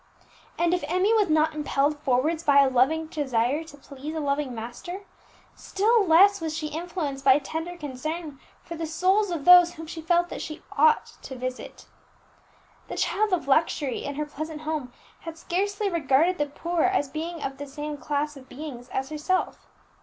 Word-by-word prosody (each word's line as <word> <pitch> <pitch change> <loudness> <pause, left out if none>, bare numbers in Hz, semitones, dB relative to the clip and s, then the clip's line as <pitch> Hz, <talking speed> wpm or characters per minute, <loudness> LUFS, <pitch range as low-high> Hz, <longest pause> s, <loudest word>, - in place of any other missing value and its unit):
And 340 +1 +2
if 360 - 0
Emmie 370 +6 +2
was 420 -5 +3
not 310 0 +3
impelled 295 0 0
forwards 290 +5 +1
by 285 -3 +5
a 270 - +2
loving 270 +6 +2
desire 280 -1 -1
to 295 -2 -13
please 285 +2 -8
a - - -2
loving 280 -3 -1
Master, 245 - -7 0.5
still 430 +3 +2
less 390 +4 +6
was 320 -1 -3
she 305 -1 -3
influenced 315 -4 -4
by 265 0 +6
tender 325 +4 -5
concern 300 +1 -5 0.2
for 335 - -8
the 325 0 -4
souls 370 +6 +2
of 330 -5 -4
those 355 -1 +8
whom 325 0 -8
she 325 +1 -7
felt 345 +2 +2
that - - -6
she 310 - -7
ought 465 -1 +4 0.2
to 265 - -8
visit. 255 +1 -6 1.0
The - - -6
child 430 0 +1
of 360 -6 0
luxury, 285 -2 +1
in 285 - -4
her 300 +1 -2
pleasant 305 +1 -7
home, 305 -5 -3 0.3
had 330 -1 -8
scarcely 405 +5 -1
regarded 330 0 +2
the 295 - +1
poor 335 +4 -2
as 370 -6 +2
being 320 +3 -5
of 270 0 -5
the 285 - -6
same 295 +2 -5
class 295 +1 -2
of 265 -1 -14
beings 260 -3 -8
as 265 0 -3
herself. 310 +5 -2
310 Hz, 180 wpm, -26 LUFS, 280-345 Hz, 1.0 s, those